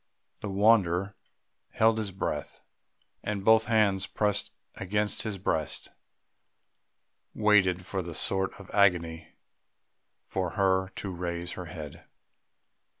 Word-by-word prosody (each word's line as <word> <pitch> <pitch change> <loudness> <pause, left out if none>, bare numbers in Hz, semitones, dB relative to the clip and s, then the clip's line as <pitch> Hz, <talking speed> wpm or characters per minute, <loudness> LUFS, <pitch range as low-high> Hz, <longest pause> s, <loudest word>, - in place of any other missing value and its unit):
The 105 - -5
wanderer 100 -2 +3 0.6
held 110 0 +3
his 105 -3 -3
breath; 95 - -4 0.6
and, 100 -2 -3
both 110 0 +6
hands 105 -4 +2
pressed 105 -2 0 0.3
against 105 +2 -1
his 110 -3 -4
breast, 80 -5 -2 1.5
waited 95 -4 +3
in 95 -3 -3
a - - -6
sort 95 -1 +2
of 100 - -12
agony 85 -5 +1 0.9
for 90 -3 -3
her 95 -1 +2
to 100 - -5
raise 85 -1 -4
her 90 - -6
head. 75 -4 -9
95 Hz, 110 wpm, -28 LUFS, 90-105 Hz, 1.5 s, both